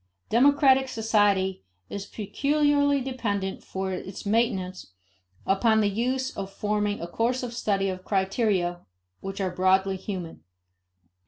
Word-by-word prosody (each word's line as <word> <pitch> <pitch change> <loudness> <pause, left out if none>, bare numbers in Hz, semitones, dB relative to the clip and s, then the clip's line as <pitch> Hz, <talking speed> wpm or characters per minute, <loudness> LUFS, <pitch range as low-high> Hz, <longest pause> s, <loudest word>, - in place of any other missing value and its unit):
Democratic 265 +1 +5
society 205 - +1 0.2
is 200 -1 -6
peculiarly 285 +6 +1
dependent 205 -7 -3
for 190 0 -4
its 185 +2 -7
maintenance 190 - -1 0.5
upon 220 +3 +3
the 210 -1 +3
use 255 +5 -1
in 195 - -4
forming 210 +1 -1
a - - -4
course 240 +8 -1
of 240 -1 -4
study 200 -4 0
of 185 -1 -4
criteria 190 -3 0 0.4
which 195 +1 -6
are 190 -2 -1
broadly 190 +1 +2
human. 180 - -6
205 Hz, 120 wpm, -26 LUFS, 190-245 Hz, 0.5 s, Democratic